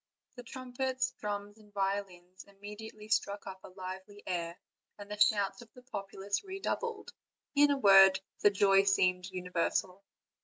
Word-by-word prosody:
The 245 Hz, -, -8 dB
trumpets, 260 Hz, +1 st, -3 dB
drums, 205 Hz, 0 st, -5 dB
and 210 Hz, -1 st, -19 dB
violins 195 Hz, -2 st, -3 dB
immediately 210 Hz, +2 st, -10 dB
struck 205 Hz, -1 st, 0 dB
up 190 Hz, -1 st, -7 dB
a -, -, -9 dB
lively 190 Hz, +2 st, -8 dB
air, 170 Hz, -1 st, -3 dB, 0.4 s
and 205 Hz, 0 st, -10 dB
the 210 Hz, -, -5 dB
shouts 200 Hz, -1 st, +3 dB
of 235 Hz, -, -15 dB
the 250 Hz, -, -14 dB
populace 200 Hz, -, -4 dB
redoubled; 415 Hz, +3 st, -4 dB, 0.4 s
in 290 Hz, 0 st, +5 dB
a 285 Hz, -, +2 dB
word, 195 Hz, -5 st, +7 dB, 0.2 s
the -, -, +6 dB
joy 195 Hz, -1 st, +5 dB
seemed 180 Hz, -2 st, +2 dB
universal. 180 Hz, +1 st, -2 dB
200 Hz, 145 wpm, -32 LUFS, 190-220 Hz, 0.4 s, word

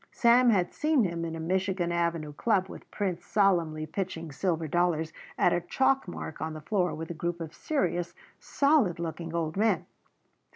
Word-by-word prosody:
Sam 240 Hz, +1 st, +5 dB
had 185 Hz, -6 st, +2 dB
seen 300 Hz, -4 st, +2 dB
him 170 Hz, -3 st, -2 dB
in 165 Hz, -1 st, -4 dB
a -, -, -6 dB
Michigan 185 Hz, +1 st, 0 dB
Avenue 170 Hz, -3 st, -1 dB
club 190 Hz, +2 st, +1 dB
with -, -, -11 dB
Prince 185 Hz, -4 st, -2 dB
solemnly 170 Hz, -7 st, +2 dB
pitching 165 Hz, -1 st, -4 dB
silver 165 Hz, +1 st, -1 dB
dollars 160 Hz, -1 st, +1 dB, 0.2 s
at 175 Hz, -, +4 dB
a 175 Hz, -, +1 dB
chalk 265 Hz, +7 st, +1 dB
mark 160 Hz, -3 st, -7 dB
on 160 Hz, 0 st, -3 dB
the 155 Hz, -, -6 dB
floor 180 Hz, -2 st, 0 dB
with 160 Hz, +2 st, -6 dB
a -, -, -3 dB
group 170 Hz, +1 st, -3 dB
of 165 Hz, -1 st, -6 dB
serious, 175 Hz, -, -1 dB, 0.2 s
solid 280 Hz, -, +2 dB
looking 165 Hz, 0 st, -5 dB
old 160 Hz, -2 st, -1 dB
men. 220 Hz, +3 st, +2 dB
175 Hz, 175 wpm, -28 LUFS, 165-195 Hz, 0.2 s, Sam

